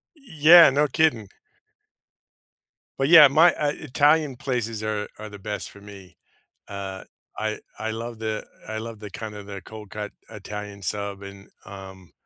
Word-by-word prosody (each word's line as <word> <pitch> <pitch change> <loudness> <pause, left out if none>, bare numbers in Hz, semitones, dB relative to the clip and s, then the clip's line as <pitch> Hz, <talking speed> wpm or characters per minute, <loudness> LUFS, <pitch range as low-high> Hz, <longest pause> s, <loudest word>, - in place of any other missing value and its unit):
Yeah, 170 - +7
no 145 +2 +2
kidding. 125 -9 +1 1.7
But, 135 +2 0
yeah, 160 -4 +10
my, 160 +6 +5
uh 145 -1 0
Italian 150 0 +2
places 115 -4 -3
are 105 -1 -2
are 110 0 -8
the 100 -1 -11
best 105 +1 -5
for 100 - -16
me. 100 -4 -14 0.5
Uh, 95 -1 -7 0.3
I 110 0 -3 0.2
I 110 0 -3
love 115 +1 -6
the 110 -1 -4 0.2
I 110 - -4
love 115 0 -7
the 105 -1 -8
kind 105 +2 -8
of 105 -1 -9
the 100 -2 -7
cold 110 -2 -11
cut 105 0 -6 0.2
Italian 105 0 -8
sub 100 +1 -4
and, 100 0 -12 0.2
um, 95 -4 -11
110 Hz, 155 wpm, -24 LUFS, 100-135 Hz, 1.7 s, yeah